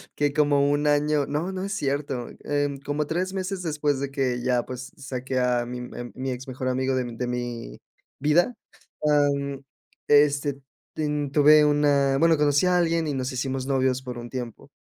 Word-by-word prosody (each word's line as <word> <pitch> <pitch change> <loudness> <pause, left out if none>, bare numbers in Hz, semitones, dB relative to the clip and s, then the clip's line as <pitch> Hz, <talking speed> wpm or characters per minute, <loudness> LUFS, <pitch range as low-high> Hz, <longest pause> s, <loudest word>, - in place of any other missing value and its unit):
que 145 -1 +1
como 145 -2 +3
1 145 +1 +1
año 145 0 +2
no, 155 +6 -2
no 185 0 -4
es 200 +1 -3
cierto, 140 -5 -2 0.2
em, 145 -1 -1
como 145 +2 -2
3 180 +5 -2
meses 190 0 -3
después 150 -4 -1
de 140 -1 -3
que 130 -3 -1
ya, 125 -1 +1
pues, 125 0 -7
s - - -13
saqué 130 0 -3
a 125 -1 +2
mi 125 - -5
a 120 0 -7
mi 130 0 -3
ex 125 +2 -6
mejor 130 0 -3
amigo 130 +1 0
de 130 -1 0
mi 120 - -7
de 125 +1 -3
mi 120 -1 -4 0.4
vida, 170 - +2 0.5
ah, 145 -1 +4
mm, 140 -1 -4 0.5
este, 145 -1 +3 0.4
ten 150 -2 -1
tuve 150 +1 +6
una 145 -2 +3
bueno, 165 +1 +4
conocí 145 +2 +3
a 180 0 +3
alguien 165 -2 +1
y 145 - -1
nos 130 -1 -2
hicimos 130 +1 -3
novios 130 -1 +1
por 125 -2 -7
un 120 0 -8
tiempo. 125 -3 -7
140 Hz, 195 wpm, -25 LUFS, 130-150 Hz, 0.5 s, tuve